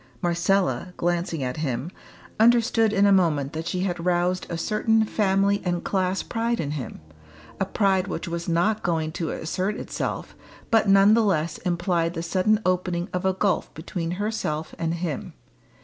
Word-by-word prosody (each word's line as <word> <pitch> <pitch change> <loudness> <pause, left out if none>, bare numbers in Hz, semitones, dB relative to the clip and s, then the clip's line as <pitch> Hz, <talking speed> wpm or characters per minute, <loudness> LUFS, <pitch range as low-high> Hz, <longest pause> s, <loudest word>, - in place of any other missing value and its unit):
Marcella, 180 +1 +1
glancing 170 -3 -1
at 125 0 -3
him, 150 +1 -3 0.5
understood 225 -1 +4
in 200 -1 +3
a 200 - +5
moment 160 -7 +2
that 160 +1 -4
she 180 +1 -1
had 175 -3 -2
roused 180 +1 +1
a 170 - -3
certain 220 +4 +2
family 200 -1 +1
and 175 -1 -1
class 185 -1 0
pride 235 0 -1
in 145 -2 -2
him 140 - -6 0.6
a - - +1
pride 195 -3 +1
which 175 - -4
was 170 0 -4
not 205 +6 +1
going 160 -3 -1
to 165 -1 -3
assert 185 +5 -2
itself, - - -4 0.4
but 225 -2 +4
none 195 +2 +6
the 230 - +5
less 170 -6 0
implied 175 -1 0
the 165 - -3
sudden 190 +5 +2
opening 180 0 0
of 180 +1 -2
a 190 - +3
gulf 190 0 0
between 165 +1 -4
herself 195 -7 -2
and 165 0 -1
him. 165 -4 -4
180 Hz, 165 wpm, -25 LUFS, 170-200 Hz, 0.6 s, none